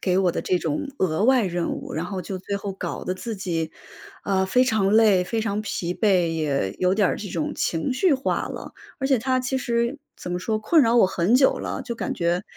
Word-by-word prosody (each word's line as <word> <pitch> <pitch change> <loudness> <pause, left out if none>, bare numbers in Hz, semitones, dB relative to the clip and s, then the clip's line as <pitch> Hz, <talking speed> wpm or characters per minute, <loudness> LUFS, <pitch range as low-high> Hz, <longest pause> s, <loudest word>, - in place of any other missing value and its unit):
给 185 -1 +1
我 185 -2 +2
的 - - -2
这 180 - 0
种 165 - -2
额 175 -1 +1
外 255 -3 +4
任 175 -2 -1
务， 275 -2 -6
然 - - -3
后 190 -2 -4
就 185 +2 -5
最 200 +2 -4
后 200 0 -5
搞 190 - -5
得 185 - -1
自 220 +3 -5
己， 165 -4 -3 0.5
啊， 190 -1 +1
非 250 +7 +3
常 215 -5 +1
累、 215 -5 +5
非 225 +5 -2
常 210 -1 -1
疲 180 -5 -3
惫， 185 -4 +2
也 145 -11 -1
有 185 +1 +2
点 200 -2 +3
儿 - - -1
这 205 - -6
种 165 -4 -2
情 165 +10 -1
绪 295 +5 +3
化 265 - -1
了。 - - -8 0.3
而 270 - -1
且 270 -2 +3
它 255 +3 +1
其 255 +1 -1
实， 235 +2 -1 0.2
怎 180 - -7
么 175 - -1
说， 215 +4 -1
困 295 +9 +4
扰 230 -1 +3
我 230 - +6
很 185 +3 +1
久 265 +1 +4
了。 - - -4
就 240 - -5
感 - - -3
觉， 175 +1 0
200 Hz, 255 characters per minute, -24 LUFS, 180-235 Hz, 0.5 s, 我